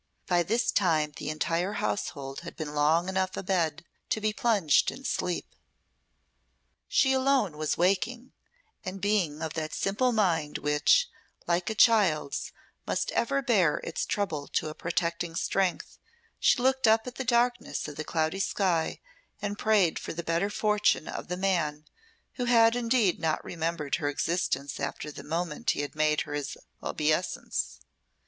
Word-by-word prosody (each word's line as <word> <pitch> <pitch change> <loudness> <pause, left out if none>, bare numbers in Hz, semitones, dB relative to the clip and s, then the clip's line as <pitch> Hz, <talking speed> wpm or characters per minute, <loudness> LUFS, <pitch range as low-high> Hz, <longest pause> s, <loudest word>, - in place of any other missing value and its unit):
By 175 -1 +2
this 225 +7 +1
time 160 -6 +2
the - - -4
entire 165 +5 -1
household 140 -10 -3
had 170 - -9
been 150 -2 -5
long 155 +4 +3
enough 190 0 -1
abed 170 -4 -1 0.2
to - - 0
be 215 0 0
plunged 210 -10 +3
in 270 - -9
sleep. 175 -1 -2 1.3
She 265 -1 +3
alone 260 - +2
was 155 0 -1
waking, 225 +8 0 0.5
and 190 -1 -5
being 185 -7 0
of 160 -1 -3
that 155 -2 -4
simple 225 +6 +1
mind 170 -9 +1
which, 150 - +3 0.4
like 175 +2 0
a 220 - -3
child's, 195 - +3 0.4
must - - -1
ever 275 +3 0
bear 200 - +3
its - - -3
trouble 160 -9 -2
to 155 - -1
a - - -6
protecting 170 0 -2
strength, 190 +1 -1 0.4
she - - +4
looked 265 -1 +3
up 220 0 +4
at 250 - -6
the 265 - -2
darkness 240 -4 +1
of 150 - -8
the 155 - -4
cloudy 160 +4 -1
sky 185 -4 0 0.4
and 205 0 -4
prayed 205 -6 +3
for - - -6
the 170 +1 -5
better 170 +5 0
fortune 210 -5 +1
of - - -6
the 180 - -3
man 165 -6 0 0.6
who - - +1
had 230 -1 +5
indeed 230 -5 +2
not 160 -1 -1
remembered 165 -3 -2
her 145 -3 -1
existence 145 -3 -1
after 150 - -4
the - - -9
moment 165 -1 -3
he - - +1
had 145 - -5
made 155 0 +2
her 145 - -5
his 145 -1 -4 0.2
obeisance. 155 +4 -1
175 Hz, 155 wpm, -28 LUFS, 155-215 Hz, 1.3 s, had